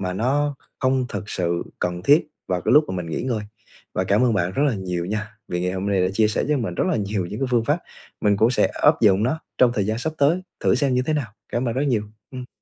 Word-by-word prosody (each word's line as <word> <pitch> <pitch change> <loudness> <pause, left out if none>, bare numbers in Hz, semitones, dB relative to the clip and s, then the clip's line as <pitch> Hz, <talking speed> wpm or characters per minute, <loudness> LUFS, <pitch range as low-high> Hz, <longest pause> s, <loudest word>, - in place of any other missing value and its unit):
mà 90 -1 -2
nó 140 +8 0 0.2
không 130 -1 +1
thực 100 -1 -6
sự 85 -1 -1 0.2
cần 90 0 -2
thiết 145 - +4 0.2
vào 90 -1 0
cái - - +1
lúc 150 +1 +7
mà 95 - -3
mình 90 -2 -4
nghỉ 80 - -3
ngơi. 120 -4 -1 0.5
Và 95 - 0
cảm 100 +6 +3
ơn 120 - +2
bạn 90 -1 0
rất 140 - 0
là 125 - 0
nhiều 90 -3 -3
nha, 105 +2 -4
vì 90 - -2
ngày 90 +1 -1
hôm 95 +1 -3
nay 100 -2 +2
đã 90 - +2
chia 110 +1 +3
sẻ 105 - 0
cho 150 - +2
mình 100 -8 -3
rất - - 0
là 185 - +1
nhiều 100 -3 -2
những 105 +5 -6
cái 135 - +1
phương 120 -2 +2
pháp, 145 +7 +1 0.4
mình 105 -1 +3
cũng 110 +4 +4
sẽ 125 - +3
áp - - +2
dụng 100 -1 +4
nó 135 +8 0 0.2
trong 125 - +6
thời 100 -2 0
gian 110 +1 -1
sắp 155 +5 -2
tới, 155 +6 +3 0.2
thử - - +3
xem 140 -3 +1
như 125 - +2
thế 155 - +1
nào, 145 -6 -1 0.2
cảm 120 +1 -1
ơn 115 - -2
rất 135 - 0
nhiều. 120 -6 +1 0.3
Ừm. 125 -1 -7
110 Hz, 280 wpm, -23 LUFS, 95-130 Hz, 0.5 s, lúc